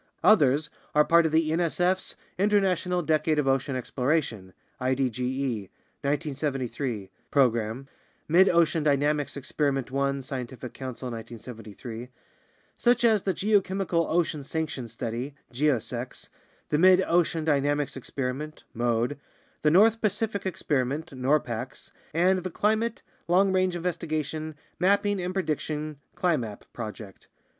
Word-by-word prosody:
Others 150 -6 +4 0.2
are 150 0 +6
part 170 -1 +5
of - - -3
the 160 0 +2
nsf's 175 +3 +1 0.2
International 190 -3 +2
Decade 155 0 +2
of 150 -2 +1
Ocean 135 0 +1
Exploration 125 - -1 0.3
(idoe) 130 -4 -1 0.3
(1973) 135 - -2 0.2
program 120 -1 +1 0.4
(Mid 180 +5 +6
ocean 165 -1 +3
Dynamics 145 0 +1
Experi 140 +1 0
ment 135 -1 -3
one, 140 0 0
Scientific 125 -2 -6
Council, 130 -1 -6
1973), 115 +1 -8 0.7
such 240 0 +3
as 220 -3 +5
the 190 - 0
Geochemical 190 -4 +1
Ocean 160 -3 +1
Sections 140 -5 -4
Study 120 +4 -4 0.2
(geosecs), 125 -2 -1 0.4
the 150 - +2
Mid 185 +1 +6
ocean 165 -2 +1
Dynamics 145 -1 +1
Experiment 135 +3 -4
(mode), 120 +4 0 0.4
the 155 - +4
North 220 +7 +5
Pacific 210 -1 0
Experiment 145 -3 -1
(norpax), 130 -2 -1 0.2
and 185 +4 +3
the 185 +1 -4
Climate, 220 +5 0 0.2
Long 190 +2 +4
range 185 -1 +2
Investigation, 155 -3 -3 0.2
Mapping, 200 +2 +2
and 180 +1 -2
Prediction 155 -4 -2 0.2
(climap) 125 - 0
project. 110 -3 -8
150 Hz, 115 wpm, -27 LUFS, 130-175 Hz, 0.7 s, are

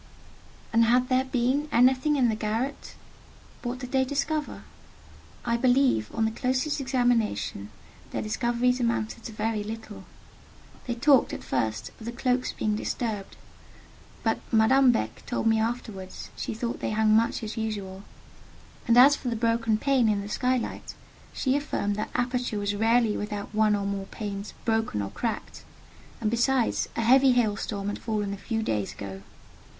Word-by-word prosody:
And 230 0 +5
had 250 +2 +3
there 260 0 +2
been 260 +4 0
anything 260 +4 +4
in 260 -4 +3
the 225 - +1
garret? 225 +6 -3 0.7
What 245 0 -3
did 250 -1 -8
they 265 -1 +3
discover? 290 +3 -2 0.8
I 235 -1 +1
believe, 250 - +3
on 225 -1 +2
the 220 - 0
closest 260 +5 -1
examination, 245 - 0 0.4
their - - -3
discoveries 240 +3 +1
amounted 235 -1 -1
to - - -5
very 215 0 -2
little. 220 0 -8 0.8
They 240 - -1
talked, 270 +2 +4
at - - -6
first, 110 -2 -2
of 220 - -10
the 235 - -3
cloaks 250 +1 0
being 215 -1 -1
disturbed; 210 -2 -3 0.9
but - - +1
Madame 255 +4 +5
Beck 110 - -3
told 245 - -2
me 225 0 +4
afterwards 220 -5 -4
she - - -4
thought 235 +1 -3
they - - -2
hung 215 0 +3
much 230 +1 +1
as 215 0 -5
usual: 205 -4 -4 0.9
and 235 0 +4
as 275 +4 +8
for 250 - -4
the 235 - -1
broken 230 -1 +1
pane 260 -2 +2
in 205 -1 +1
the 200 - -7
skylight, 250 +2 -2 0.4
she 265 0 0
affirmed 245 -8 -1
that 215 - -3
aperture 245 -2 -1
was 205 0 -1
rarely 225 +1 +3
without 210 0 -5
one 215 -1 +3
or 200 -1 -2
more 200 -1 -3
panes 200 -1 -6
broken 225 - 0
or 100 - -5
cracked: 230 -2 -4 0.6
and 220 -2 0
besides, 240 +1 +1
a - - 0
heavy 260 +3 +5
hail 225 -4 +2
storm 200 0 -4
had 205 - -3
fallen 210 -3 -2
a - - -5
few 225 +3 -2
days 105 - -2
ago. 95 -1 -8
230 Hz, 165 wpm, -27 LUFS, 210-250 Hz, 0.9 s, as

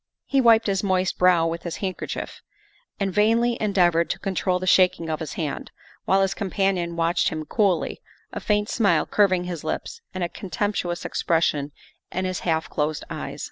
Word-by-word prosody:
He 275 -1 +2
wiped 230 -2 +5
his 195 -2 +1
moist 185 -1 0
brow 180 -2 +5
with 165 0 -2
his 170 - -5
handkerchief 190 -2 -5 0.6
and 195 -2 -1
vainly 230 +4 +3
endeavored 175 -5 +2
to - - -1
control 190 -1 -1
the 185 - -4
shaking 180 -3 +3
of 155 - -2
his 160 - -5
hand, 155 -5 -4 0.4
while 195 +1 +3
his 190 - 0
companion 190 -3 -1
watched 170 +1 +1
him 155 -1 -5
coolly, 195 -4 0 0.3
a - - -3
faint 210 0 0
smile 220 -4 +2
curving 185 -4 +2
his 175 -3 -5
lips 155 - -4
and 185 -1 -3
a - - +1
contemptuous 185 -2 -3
expression 150 -4 0 0.4
in 185 +1 -2
his 185 -1 -2
half 160 -2 0
closed 150 0 -2
eyes. - - -5
185 Hz, 175 wpm, -24 LUFS, 170-200 Hz, 0.6 s, wiped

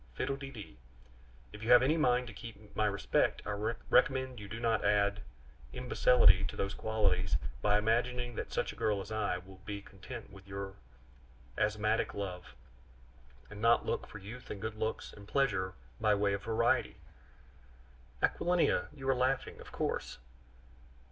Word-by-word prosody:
Fiddle 135 - -1
de 135 0 -7
dee. 105 - -10 0.8
If 105 - -9
you 115 - -4
have 125 0 +8
any 145 +5 +3
mind 125 -5 +3
to 115 - -9
keep 110 -1 -11
my 105 - +2
respect, 100 -1 +1
I 100 - -2
recommend 125 +4 +1
you 105 - -8
not 115 -1 +1
to - - +1
add 100 0 +2 0.5
imbecility 125 0 +5
to - - -5
these 100 0 -2
qualities 100 -6 +1 0.2
by 105 0 +4
imagining 120 +3 0
that - - -5
such - - -1
a - - -15
girl 105 -2 +1
as 100 +2 -7
I 110 -3 0
am 90 +1 -8
will 95 0 -14
be 100 -1 -5
content 105 +5 -10
with 95 0 -14
your 100 0 -5 0.8
asthmatic 105 +1 +1
love, 90 -8 -5 1.0
and 105 +1 -8
not 115 +1 +4
look - - -2
for - - -9
youth 110 +5 -10
and 100 - -5
good 110 +1 -3
looks 110 +1 -3
and 100 -1 -13
pleasure 105 -8 +1 0.2
by 110 -2 +4
way 100 0 +1
of 100 - -2
variety 110 +1 +1 0.7
" - - -23
"Aquilina! 175 -1 +2
you 135 -2 -7
are 135 - +5
laughing, 130 +1 0
of - - -12
course?" - - -2
105 Hz, 170 wpm, -33 LUFS, 100-120 Hz, 1.0 s, have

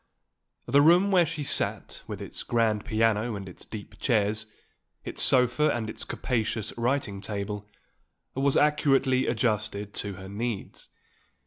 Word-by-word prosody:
The 140 - +4
room 175 +6 +5
where 180 -3 +5
she 155 -2 -4
sat, - - -1
with - - -6
its - - -6
grand 110 -3 +1
piano 110 0 +1
and 100 -1 -7
its 90 - -10
deep 105 -2 -9
chairs, 110 -2 +1 0.6
its - - -2
sofa 130 +4 +4
and 110 -2 -2
its - - -6
capacious 110 -3 -2
writing 120 -5 -1
table, 105 0 -5 0.6
was 135 +1 +2
accurately 135 -3 +3
adjusted 105 -3 -1
to 100 -1 -3
her 95 +1 -9
needs. 105 +1 -5
115 Hz, 135 wpm, -27 LUFS, 105-135 Hz, 0.6 s, room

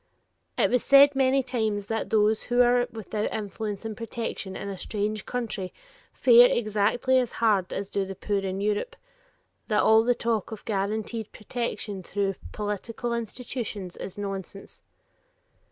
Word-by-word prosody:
It - - +3
was 250 -1 +2
said 280 0 +7
many 265 0 +3
times 220 -5 -1
that 225 +1 -3
those 215 0 +3
who 245 0 +4
are 245 0 +3
without 215 -1 -3
influence 210 0 -4
and 220 -1 -4
protection 225 -4 -5
in - - -5
a 200 - -4
strange 210 +2 -3
country 220 -7 -3 0.4
fare 245 -1 +7
exactly 235 +4 +2
as 245 -2 -2
hard 205 -5 +2
as 195 - -3
do 200 0 -1
the 195 0 -6
poor 200 +1 -1
in 195 0 -3
Europe; 210 - -1 0.7
that 215 - +2
all 220 0 +6
the 245 +1 +2
talk 230 -2 -1
of 220 - -8
guaranteed 215 +2 -2
protection 210 -3 -4
through 195 +2 -1 0.2
political 215 +3 -3
institutions 230 -4 -5
is 195 - -7
nonsense. 195 -1 -6
215 Hz, 150 wpm, -26 LUFS, 200-235 Hz, 0.7 s, said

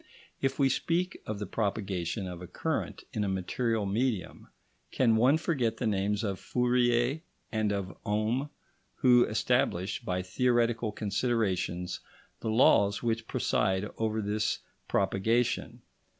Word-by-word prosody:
If 135 0 0
we 140 - +4
speak 175 +6 -1
of 105 - -3
the 105 - -4
propagation 100 -2 -2
of 90 -1 -7
a 90 - -7
current - - -3
in 105 - 0
a - - 0
material 105 +4 -1
medium, 105 -4 -2 0.4
can 115 -4 +3
one 130 +7 +5
forget 130 -9 0
the - - -2
names 105 0 0
of 100 -3 -2
Fourier 125 +3 +1 0.3
and 110 -2 0
of 95 -3 -3
Ohm, 110 +7 0 0.5
who 125 -1 +5
established 105 -1 0
by 90 -4 -2
theoretical 120 +2 +1
considerations 100 -5 -1 0.4
the 110 - -3
laws 100 -3 +4
which 115 -1 -1
preside 95 +2 0
over 110 -1 0
this 105 +1 -1 0.3
propagation? 110 +5 0
110 Hz, 130 wpm, -30 LUFS, 100-120 Hz, 0.5 s, one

